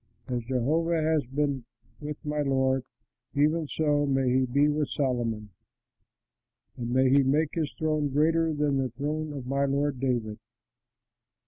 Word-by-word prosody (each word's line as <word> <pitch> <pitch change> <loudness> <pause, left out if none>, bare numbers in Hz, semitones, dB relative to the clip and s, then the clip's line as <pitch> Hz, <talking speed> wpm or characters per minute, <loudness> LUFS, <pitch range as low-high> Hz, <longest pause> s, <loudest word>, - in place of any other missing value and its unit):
As 120 -2 -2
Jehovah 155 +7 +1
has 155 -4 +1
been 140 -1 -1 0.4
with 150 0 -5
my 150 0 -1
lord, 130 -2 +1 0.5
even 155 +2 +2
so 145 -1 +1
may 135 -1 +1
he 130 - +2
be 140 +4 +3
with 150 -1 0
Solomon, 115 -6 -1 1.2
and 120 -1 -4
may 130 +2 +3
he 140 +1 +6
make 145 +3 +1
his 155 -4 -1
throne 155 -2 0
greater 160 +3 +2
than 145 -2 0
the 130 -1 0
throne 150 +5 -3
of 140 -4 -6
my 140 +2 0
lord 140 -1 0
David!" 120 -5 -1
140 Hz, 145 wpm, -27 LUFS, 130-150 Hz, 1.2 s, he